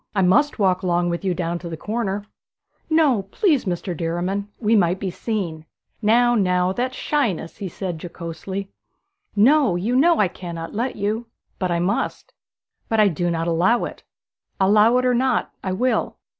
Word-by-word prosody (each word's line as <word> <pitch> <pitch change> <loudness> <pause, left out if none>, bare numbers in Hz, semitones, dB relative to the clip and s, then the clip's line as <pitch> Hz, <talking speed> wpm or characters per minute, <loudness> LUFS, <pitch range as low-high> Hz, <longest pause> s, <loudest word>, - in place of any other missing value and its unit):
I 195 - +3
must 290 +12 +3
walk 190 -3 +2
along 175 -1 +1
with 170 +3 -3
you 185 -2 0
down 170 -1 -2
to 170 - -7
the 165 - -5
corner.' 205 -1 -3 0.6
'No, 305 -9 +3
please, 300 - +2
Mr. 180 0 -3
Derriman; 175 +5 -2
we 225 0 +2
might 180 -2 +2
be 190 -2 -3
seen.' 175 -7 -3 0.4
'Now, 240 +3 +4
now 180 -4 +2
that's 255 +4 -2
shyness!' 235 - -1
he 200 - -5
said 175 -3 -5
jocosely. 180 +3 -6 0.6
'No; 250 -1 +4
you 210 +8 -1
know 330 +5 +5
I 205 - +4
cannot 170 -2 -7
let 240 +4 -2
you.' 215 +3 -2 0.3
'But 185 - -1
I 170 - +1
must.' 200 - -2 0.6
'But 225 - +1
I 210 -1 +6
do 175 +1 -1
not 165 0 -1
allow 175 +8 +2
it.' - - -8 0.6
'Allow 210 +5 +5
it 255 - +1
or 250 - +3
not, 255 0 +1
I 190 - -2
will.' 250 +7 0
195 Hz, 170 wpm, -22 LUFS, 175-235 Hz, 0.6 s, I